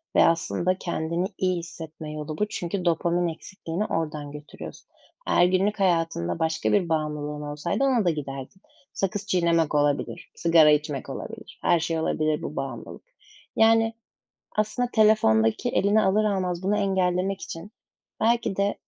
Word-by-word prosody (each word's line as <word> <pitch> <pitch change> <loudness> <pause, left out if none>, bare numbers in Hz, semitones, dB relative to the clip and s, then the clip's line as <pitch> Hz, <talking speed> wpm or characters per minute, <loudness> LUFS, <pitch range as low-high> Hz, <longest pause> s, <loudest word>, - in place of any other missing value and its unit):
ve - - +7
aslında 170 +2 +1
kendini 170 0 -2
iyi 185 -1 +1
hissetme 160 -2 -8
yolu 155 0 -5
bu. 210 - +1
Çünkü 180 -1 -4
dopamin 175 +1 +1
eksikliğini 170 +3 -5
oradan 150 -5 -3
götürüyorsun. 150 +1 -10 0.4
Eğer 175 - +5
günlük 190 +3 +1
hayatında 165 - +1
başka 160 0 0
bir 185 -5 +2
bağımlılığın 150 -2 -2
olsaydı 150 - -2
ona 255 -6 +2
da 175 - +4
giderdin. 140 +2 -5 0.3
Sakız 200 +1 -2
çiğnemek 170 -5 +2
olabilir. 145 -1 0
Sigara 165 -2 +5
içmek 150 -2 -1
olabilir. - - -8
Her 170 - +3
şey 160 0 -1
olabilir 155 -1 0
bu 150 - -6
bağımlılık. 130 -4 -6 0.5
Yani, 225 0 +4 0.6
aslında 215 +4 0
telefondaki 210 - +3
eline 210 -1 +3
alır 210 +2 +3
almaz 185 -3 -1
bunu 200 +2 +1
engellemek 190 -1 0
için 165 +5 -8 0.5
belki 230 -3 +1
de 200 +1 +1
170 Hz, 140 wpm, -25 LUFS, 155-195 Hz, 0.6 s, ve